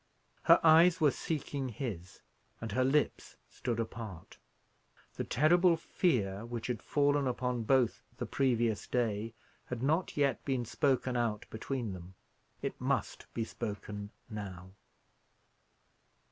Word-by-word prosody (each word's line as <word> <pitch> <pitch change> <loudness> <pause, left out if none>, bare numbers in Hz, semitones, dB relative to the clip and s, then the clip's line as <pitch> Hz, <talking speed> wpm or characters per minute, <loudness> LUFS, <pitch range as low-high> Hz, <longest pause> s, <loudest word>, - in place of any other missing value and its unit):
Her - - +7
eyes 165 +2 +7
were 150 -4 +5
seeking 140 -4 -3
his, 105 - -6 0.4
and 115 -2 -5
her 130 +5 +2
lips 145 +3 0
stood 120 -2 -3
apart. 110 -6 -6 0.8
The - - -3
terrible 170 +5 +4
fear 110 - 0
which 120 -1 -5
had 120 -3 -2
fallen 145 -1 +2
upon 125 -2 -1
both 130 -1 +3 0.2
the - - -3
previous 120 -6 +1
day 115 -2 -1 0.3
had 125 -1 -4
not 160 +6 +1
yet 140 -2 +2
been 130 -3 -1
spoken 130 -1 +1
out 115 -3 0
between 115 -1 -3
them. 90 +1 -10 0.5
It - - -4
must - - -2
be 115 - 0
spoken 105 -1 -5 0.2
now. 95 -4 -7
120 Hz, 125 wpm, -32 LUFS, 110-140 Hz, 0.8 s, Her